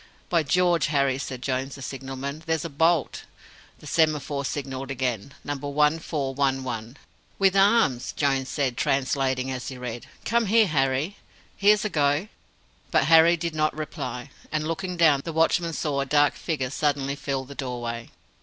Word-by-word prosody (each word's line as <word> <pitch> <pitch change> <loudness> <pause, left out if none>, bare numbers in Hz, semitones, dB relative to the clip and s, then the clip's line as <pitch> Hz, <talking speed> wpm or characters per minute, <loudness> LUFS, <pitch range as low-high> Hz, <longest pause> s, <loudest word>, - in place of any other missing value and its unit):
"By 170 -2 +3
George, 175 +3 +2
Harry," 140 -3 +1
said 130 -2 -6
Jones, 135 +1 -2
the 140 - -9
signalman, 135 +3 -5
"there's 160 -1 0
a 165 - -5
bolt!" 160 +1 +1 0.5
The - - -16
semaphore 150 -3 +1
signalled 135 -1 -4
again: 130 -2 -3
"Number 145 0 -4
1411". 135 -5 -1 0.4
"WITH 195 -1 +3
ARMS!" 195 - +3
Jones 135 -2 0
said, 130 -5 -1
translating 130 -1 0
as 130 -1 -5
he 130 - -6
read. 120 -1 -6 0.2
"Come 235 0 +2
here, 220 +2 +5
Harry! 140 +2 0 0.4
here's 210 +1 +4
a - - 0
go!" 145 +4 +1 0.6
But - - +3
Harry 165 +1 +6
did 170 0 -3
not 155 0 0
reply, 140 -4 -5 0.2
and, 155 0 -1
looking 180 +2 -3
down, 155 -5 +5
the 165 - -4
watchman 165 +1 +2
saw 145 -3 -1
a - - -1
dark 145 +1 +4
figure 135 -6 -3
suddenly 140 -2 0
fill 140 -2 -3
the 140 - -10
doorway. 120 -3 -5
140 Hz, 155 wpm, -25 LUFS, 130-160 Hz, 0.6 s, Harry